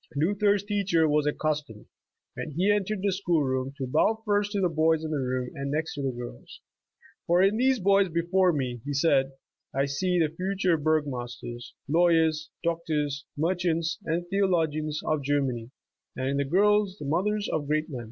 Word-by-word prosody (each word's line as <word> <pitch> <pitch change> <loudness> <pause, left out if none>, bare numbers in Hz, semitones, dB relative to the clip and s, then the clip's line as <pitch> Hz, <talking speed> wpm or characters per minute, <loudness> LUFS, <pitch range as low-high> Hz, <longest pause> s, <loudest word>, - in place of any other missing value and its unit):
Luther's 200 +6 +2
teacher 200 -6 +1
was 150 0 +2
accustomed, 150 -7 -2 0.5
when - - -5
he 190 +4 +3
en 205 -2 +1
tered 210 -1 -3
the 200 - +2
school 175 -5 +1
room, 130 0 -1
to 135 - -3
bow 160 - +2
first 205 -1 +1
to 205 - 0
the 185 - +3
boys 160 -1 +2
in 155 - -4
th^ - - -1
room, 130 -3 -2
arid 140 0 -4
next 155 +3 -2
to 140 - -5
the 135 - 0
girls. 120 - -9 0.7
''For 180 +3 +5
in 210 +2 -1
these 260 +1 +3
boys 195 0 +3
before 175 +3 +2
me," 125 -6 -3
he 145 0 -4
said, 135 -2 +2 0.4
"I 135 0 +2
see 180 +6 0
the 160 -3 +2
future 185 -1 +1
burgomasters, 130 -6 -3
lawyers, 160 -1 +3
doctors, 155 -4 -1
merchants 170 +1 0
and 170 +1 -2
theologians 160 -6 0
of 155 -2 0
Germany, 135 -5 -1 0.5
and 130 +1 -2
in 140 - 0
the 140 - 0
girls 200 +4 +2
the 150 - -7
mothers 200 +8 0
of 145 -2 -2
great 155 +1 0
men." 130 - -4
160 Hz, 180 wpm, -27 LUFS, 140-185 Hz, 0.7 s, For